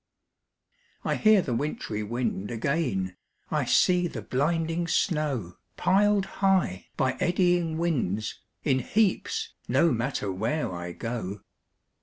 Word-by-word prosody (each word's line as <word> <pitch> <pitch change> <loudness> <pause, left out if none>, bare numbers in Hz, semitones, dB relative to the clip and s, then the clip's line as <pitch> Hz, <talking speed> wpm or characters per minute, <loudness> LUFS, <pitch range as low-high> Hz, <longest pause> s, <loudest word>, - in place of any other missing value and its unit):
I - - +1
hear 215 -3 +5
the 125 - -2
wintry 115 -5 -2
wind 105 -2 -2
again, 115 - -1 0.3
I - - +1
see 180 -1 +4
the - - -6
blinding 165 +5 0
snow, 145 - 0 0.2
Pil'd 200 +1 +3 0.2
high, 190 - +2
by 130 -1 +2
eddying 175 -2 +2
winds, 120 - -1 0.2
in 130 -3 +2
heaps, 225 - 0
No 170 -1 +4
matter 120 -4 -1
where 110 +5 -1
I 85 0 -5
go. 105 -3 -4
145 Hz, 115 wpm, -27 LUFS, 110-175 Hz, 0.3 s, hear